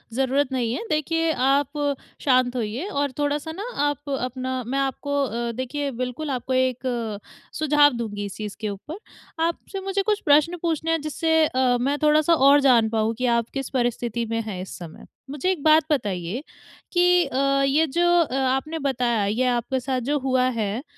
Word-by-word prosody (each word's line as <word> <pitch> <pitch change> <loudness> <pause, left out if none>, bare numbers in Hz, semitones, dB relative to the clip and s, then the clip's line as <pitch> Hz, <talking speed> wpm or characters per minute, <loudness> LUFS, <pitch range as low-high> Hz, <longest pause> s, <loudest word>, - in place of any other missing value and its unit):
ज़रूरत 270 +1 +1
नहीं 240 -3 -1
है। - - -3
देखिए, 325 +2 +1
आप 285 +2 +1 0.3
शांत 255 -2 +2
होइए 235 - -3
और 285 -7 -1
थोड़ा-सा 290 +2 -1
ना 385 +6 -6 0.2
आप 290 0 -3
अपना 255 0 -3
मैं 270 +2 -1
आपको 280 +1 -1
अ, 235 -1 -2
देखिए, 270 +4 -3
बिल्कुल 255 +5 -4
आपको 260 0 -3
एक 245 -4 -1 0.3
सुझाव 295 -2 +4
दूँगी 210 -3 -4
इस 200 - -7
चीज़ 210 -2 -5
के 215 - -2
ऊपर। 205 - -7 0.5
आपसे 340 +3 -3
मुझे 390 +1 -1
कुछ 420 +1 0
प्रश्न 305 +4 +4
पूछने 325 -1 -1
हैं, 325 -2 +1
जिससे 320 +1 +1
अ, 255 -3 +1
मैं 280 +3 0
थोड़ा-सा 305 +2 +4
और 285 -2 +6
जान 240 -5 +4
पाऊँ 220 0 0
कि 255 - -1
आप 230 0 -2
किस 270 -2 -3
परिस्थिति 240 -2 -1
में 230 0 -1
है 205 -4 -5
इस 185 - -8
समय। 170 -2 -10 0.2
मुझे 295 +6 -2
एक 325 -7 -4
बात 310 0 +6
बताइए 205 - -2 0.5
कि 355 0 +4
अ, 275 +1 +1
ये 300 +4 +3
जो 340 +6 0 0.2
अ, 270 -5 -2
आपने 270 +4 0
बताया, 245 -6 0
ये 225 +6 0
आपके 250 +1 0
साथ 255 0 -2
जो 295 - +1
हुआ 260 -1 +1 0.2
है, 215 +4 -2
265 Hz, 180 wpm, -23 LUFS, 240-295 Hz, 0.5 s, और